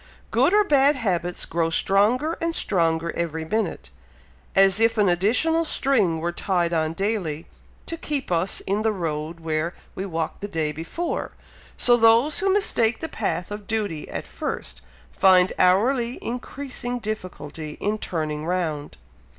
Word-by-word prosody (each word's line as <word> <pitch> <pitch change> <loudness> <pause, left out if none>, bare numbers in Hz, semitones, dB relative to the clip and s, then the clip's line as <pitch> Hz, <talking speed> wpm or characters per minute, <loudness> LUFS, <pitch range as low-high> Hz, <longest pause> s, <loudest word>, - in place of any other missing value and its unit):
"Good - - +3
or 420 +1 +5
bad 285 -5 +4
habits 180 -8 -1
grow 165 0 0
stronger 220 - +2
and 335 0 -1
stronger 165 -3 +1
every 160 -1 -3
minute, 180 - -2 0.6
as 195 +1 +5
if 225 0 +3
an 210 -2 +4
additional 230 - +2
string 235 - +2
were 170 +2 -1
tied 175 -1 0
on 160 -1 0
daily, 180 -5 -2 0.4
to 330 - -4
keep 290 - -4
us 175 +2 0
in 200 +2 -1
the 220 0 +2
road 165 -3 -4
where 160 +1 -2 0.2
we 195 - -4
walked 165 -3 -3
the 205 - -3
day 160 -5 -1
before; 165 - -4 0.4
so 240 -1 +4
those 230 - +4
who 390 -1 +2
mistake 240 - +2
the 320 - -4
path 195 -4 -3
of 205 -1 -7
duty 205 -9 -2
at - - -5
first, - - -5 0.3
find 185 -1 +4
hourly 235 +7 +3
increasing 245 0 -4
difficulty 180 -9 -6
in 210 +1 -1
turning 155 -5 -3
round." 160 -4 -2
195 Hz, 150 wpm, -24 LUFS, 165-235 Hz, 0.6 s, or